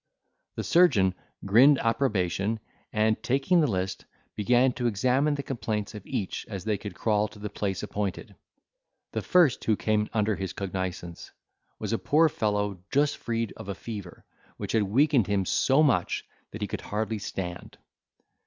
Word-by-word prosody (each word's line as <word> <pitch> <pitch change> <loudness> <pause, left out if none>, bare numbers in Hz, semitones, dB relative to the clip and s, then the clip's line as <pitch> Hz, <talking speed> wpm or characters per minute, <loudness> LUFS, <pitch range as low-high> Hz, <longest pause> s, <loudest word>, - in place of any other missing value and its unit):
The - - -3
surgeon 110 - +4 0.3
grinned 125 +8 +6
approbation, 110 -4 0 0.3
and, 110 0 +1
taking 135 +9 +2
the 150 - +3
list, 95 -2 -2 0.3
began 125 +4 +3
to 120 0 -1
examine 130 +7 +2
the 140 - -4
complaints 110 -6 -3
of 105 -3 -8
each 95 - -3
as 100 -4 -5
they 110 0 0
could 105 - -7
crawl 105 -1 +1
to 105 - -15
the 105 0 -6
place 100 -2 -3
appointed. 100 -2 -4 0.8
The - - -2
first 175 -8 +3
who 110 - +3
came 105 0 0
under 110 -1 +1
his 95 -1 -4
cognizance 95 -3 -5 0.5
was - - -3
a - - 0
poor 160 +2 +4
fellow 105 -6 -1
just 145 +1 +2
freed 115 -1 -2
of 95 - -9
a 100 - -3
fever, 100 -6 -8 0.3
which - - -4
had 110 - +3
weakened 125 +3 +3
him 100 -2 +1
so 135 - +3
much 125 - +1 0.2
that - - -6
he - - -1
could - - -5
hardly 110 +1 -2
stand. 90 -3 -6
110 Hz, 165 wpm, -27 LUFS, 100-125 Hz, 0.8 s, grinned